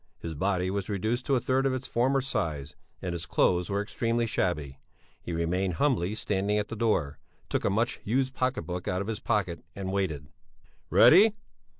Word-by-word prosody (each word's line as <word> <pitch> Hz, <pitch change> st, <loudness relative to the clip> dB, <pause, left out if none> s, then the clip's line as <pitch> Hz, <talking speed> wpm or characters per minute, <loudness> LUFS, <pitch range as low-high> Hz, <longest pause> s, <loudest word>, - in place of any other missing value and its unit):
His 85 Hz, -, -6 dB
body 95 Hz, +3 st, 0 dB
was 100 Hz, 0 st, -3 dB
reduced 110 Hz, +5 st, -1 dB
to 140 Hz, -, +3 dB
a -, -, +3 dB
third 130 Hz, +3 st, +1 dB
of 130 Hz, -, 0 dB
its 130 Hz, +1 st, -5 dB
former 135 Hz, +3 st, +2 dB
size, 85 Hz, -, -3 dB, 0.3 s
and 90 Hz, -2 st, -2 dB
his 85 Hz, -, -5 dB
clothes 90 Hz, -1 st, +2 dB
were 100 Hz, +1 st, 0 dB
extremely 115 Hz, +1 st, -1 dB
shabby. 75 Hz, -10 st, -2 dB, 0.4 s
He -, -, -6 dB
remained 85 Hz, +2 st, 0 dB
humbly 110 Hz, -, +1 dB
standing 105 Hz, 0 st, 0 dB
at 105 Hz, 0 st, -1 dB
the 115 Hz, -, -4 dB
door, 90 Hz, -11 st, 0 dB, 0.3 s
took -, -, -1 dB
a -, -, +3 dB
much 115 Hz, +4 st, 0 dB
used 130 Hz, +4 st, 0 dB
pocket 130 Hz, 0 st, -1 dB
book 90 Hz, 0 st, -5 dB
out 90 Hz, +1 st, 0 dB
of 100 Hz, -, -4 dB
his 110 Hz, -2 st, -3 dB
pocket 95 Hz, -7 st, -1 dB
and 95 Hz, -1 st, -4 dB
waited. 80 Hz, -7 st, -2 dB, 0.6 s
"Ready?" 205 Hz, +6 st, +7 dB
100 Hz, 190 wpm, -28 LUFS, 90-120 Hz, 0.6 s, Ready